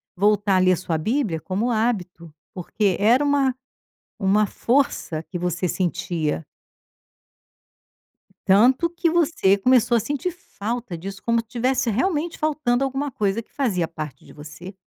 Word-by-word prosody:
voltar 205 0 +2
ali 185 0 +4
a 180 - +2
sua 170 -2 -2
bíblia 210 - -1
como 200 +6 -2
hábito, 185 -8 -2 0.2
porque 190 +2 0
era 240 +7 +4
uma 280 -3 +2 0.7
uma 200 +2 +3
força 235 - 0
que 175 - -6
você 180 +1 -1
sentia. 165 -3 -2 2.0
Tanto 245 - +4
que 340 0 0
você 320 - +2
começou 240 +2 +3
a - - +2
sentir 290 - -2
falta 235 - -6
disso, 195 +3 -8
como 230 0 +2
se 230 - -6
tivesse 245 +1 0
realmente 320 - -1
faltando 290 -5 0
alguma 270 +1 -2
coisa 210 -1 -1
que - - -25
fazia 195 - 0
parte 155 -4 -8
de - - -15
você. 150 +6 -10
215 Hz, 140 wpm, -23 LUFS, 180-260 Hz, 2.0 s, ali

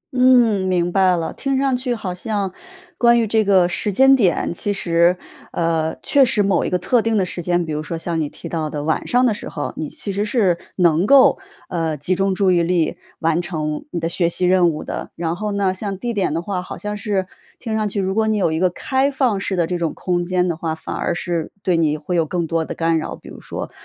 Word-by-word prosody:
嗯， 240 -7 +4
明 175 -1 +1
白 185 -2 +3
了。 165 - -3
听 275 -1 -1
上 270 -1 +1
去 250 -1 -1
好 190 -5 -4
像 200 -1 -3 0.5
关 235 -1 +5
于 230 - +2
这 220 +1 +2
个 190 -3 +4
时 205 +3 -1
间 270 +6 +6
点， 185 -7 +1
其 205 +4 -2
实， 175 -2 +2 0.3
呃， 165 -1 0
确 280 -2 +4
实 235 -5 +2
某 195 -3 +2
一 - - -1
个 180 - +1
特 235 +6 +2
定 225 -1 0
的 190 - +2
时 175 - -5
间， 175 0 0
比 155 - -4
如 150 - -2
说 165 +2 -5
像 165 -1 -2
你 145 - -2
提 - - -9
到 160 -2 -3
的 145 -1 -4
晚 160 0 -1
上 250 +1 +3
的 225 - +3
时 - - -7
候， 145 - -4
你 155 - -4
其 200 - -4
实 200 +2 -1
是 205 -6 +1 0.2
能 175 +1 +3
够， 275 +6 +6 0.3
呃， 165 -3 -2
集 160 +7 0
中 195 0 0
注 190 -2 +3
意 175 -1 +3
力 170 -1 +1 0.3
完 165 +1 +1
成 155 -4 -3
你 170 - -3
的 165 - -2
学 170 0 0
习 180 +1 -1
任 180 -1 +4
务 155 -1 -4
的。 - - -5
然 165 0 -2
后 210 +2 -3
呢， 195 -2 +1
像 195 0 -5
地 240 +2 -3
点 195 -7 0
的 165 +2 -2
话， 185 -2 -3
好 180 - -8
像 210 0 -4
是 200 -3 -1 0.3
听 225 -3 -4
上 215 -1 0
去， 200 - -3
如 190 0 -1
果 220 +1 +1
你 215 -1 +1
有 175 -5 +1
一 160 - -1
个 185 0 +3
开 265 +9 0
放 255 -7 0
式 195 0 -2
的 170 -2 +1
这 175 0 -3
种 165 -2 -2
空 175 -1 -1
间 180 0 0
的 170 - -1
话， 160 -1 -3
反 - - -6
而 - - -1
是 170 -3 -3
对 180 -3 +2
你 155 -2 +1
会 165 +4 -4
有 165 - +3
更 175 0 -1
多 165 0 -1
的 - - -6
干 165 -1 +1
扰。 - - -5
比 - - -14
如 - - -11
说 - - -6
180 Hz, 270 characters per minute, -20 LUFS, 165-210 Hz, 0.5 s, 间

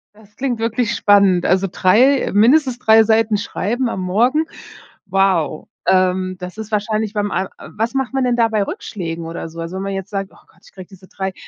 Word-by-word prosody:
Das 210 -1 -21
klingt 255 -4 -2
wirklich 230 0 -1
spannend. 200 -3 +4
Also 190 +1 +2
3 245 +11 +3
mindestens 250 +4 +3
3 220 -1 +5
Seiten 220 -1 +2
schreiben 235 +5 -2
am 190 - -4
Morgen. 240 +12 +1 0.6
Wow, 190 -5 0 0.2
ähm, 185 0 +2
das 180 +3 -8
ist 220 0 -7
wahrscheinlich 215 0 -1
beim 205 -2 -1
al 185 +1 -1
äh, - - -12
was 230 +5 -3
macht 265 -1 -1
man 270 -1 0
denn 245 -1 +1
da 230 -1 +3
bei 215 -2 0
Rückschlägen 170 -4 -6
oder 165 0 -6
so? 165 +1 -11
Also, 165 +3 -5
wenn 190 - -4
man 195 0 -3
jetzt 195 +1 -6
sagt: 195 -1 -3
„Oh - - -20
Gott, - - -27
ich - - -19
kriege 185 -2 -11
diese 190 -1 -17
3" 190 -1 -5
205 Hz, 210 wpm, -18 LUFS, 185-230 Hz, 0.6 s, 3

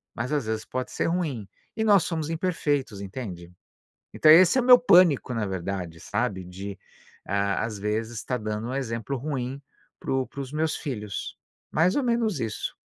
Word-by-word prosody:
mas 120 +5 -3
às 140 -6 0
vezes 110 0 -2
pode 130 0 -4
ser - - -1
ruim 155 - -2 0.3
e 220 - +1
nós 200 -4 +5
somos 160 -2 -3
imperfeitos, 145 - -1
entende? 95 -5 -7 0.6
Então 155 - +6
esse 180 +8 +7
é - - +4
o - - -3
meu 250 -1 +9
pânico, 175 - +5
na 110 -2 -1
verdade, 90 -3 -4
sabe, 100 -2 -2
de, 95 +2 -8 0.5
hã, 100 0 +1
às 110 -2 -3
vezes, 110 +3 -2
estar 125 +3 -2
dando 110 +1 -3
um 130 - -3
exemplo 125 0 -3
ruim 135 -1 -4 0.4
para - - -5
o 130 -1 +1
para 140 - -10
os 135 0 -7
meus 155 +1 0
filhos, 105 - -5 0.3
mais 170 +4 +3
ou 285 - +1
menos 235 - 0
isso. 110 -3 -3
125 Hz, 180 wpm, -26 LUFS, 105-160 Hz, 0.6 s, meu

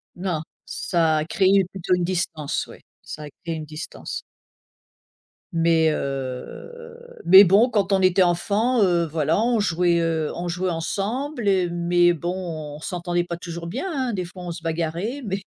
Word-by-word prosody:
Non, 175 -4 -2 0.2
ça 165 -3 +1
a 155 - -1
créé 195 +1 +3
plutôt 185 -1 0
une 180 - -1
distance, 170 -5 -2
oui. - - -13 0.2
Ça 150 - -8
a - - -7 0.2
créé 165 -1 -3
une 155 -1 -6
distance. 155 +2 -7 1.3
Mais, 165 -1 +3
heu, 140 - -5 0.3
mais 190 +3 +10
bon 205 +7 +5
quand 200 -4 0
on 190 -1 +3
était 185 0 +4
enfant, 210 +7 +1
heu, 175 -3 +3
voilà, 155 +5 0
on 235 -2 +2
jouait, 175 -3 +2
heu, 165 -2 0
on 175 +1 -4
jouait 180 +2 -1
ensemble, 220 - -3 0.3
mais 175 0 +3
bon 165 -3 -5
on - - -13
s'entendait 175 +1 -2
pas 170 - -4
toujours 170 -1 -7
bien, 255 - -4
hein, 260 -6 -1
des 185 -2 -2
fois 180 +1 -10
on 175 - -4
se 165 0 -8
bagarrait 170 - -2
mais, 195 0 -2
175 Hz, 165 wpm, -23 LUFS, 165-195 Hz, 1.3 s, mais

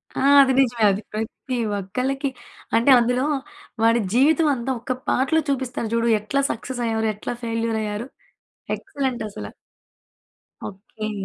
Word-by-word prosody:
ఆ! - - -2 0.2
అది 265 -1 +4
నిజమే. 240 -4 +2
అది 195 +2 -2
ప్రతి 225 +4 -4 0.2
ఒక్కళ్ళకి 255 +8 -2 0.5
అంటే 230 +4 +3
అందులో 245 +3 +1 0.6
వాడి 230 +1 +4
జీవితం 305 +6 +4
అంతా 250 +2 -3
ఒక 255 +3 -2 0.2
పాటలో 320 +5 +2
చూపిస్తారు 255 -4 -2
చూడు. 230 0 +1
ఎట్లా 275 +7 -1
సక్సెస్ 245 +3 -5
అయ్యారు. 225 -1 0
ఎట్లా 210 - -5
ఫెయిల్యూర్ 230 -1 -1
అయ్యారు. 210 +3 -4 0.7
ఎక్సలెంట్ 260 -5 -3
అసల. 205 - -7 1.2
ఓకే. 215 +2 -7
235 Hz, 130 wpm, -23 LUFS, 220-265 Hz, 1.2 s, అది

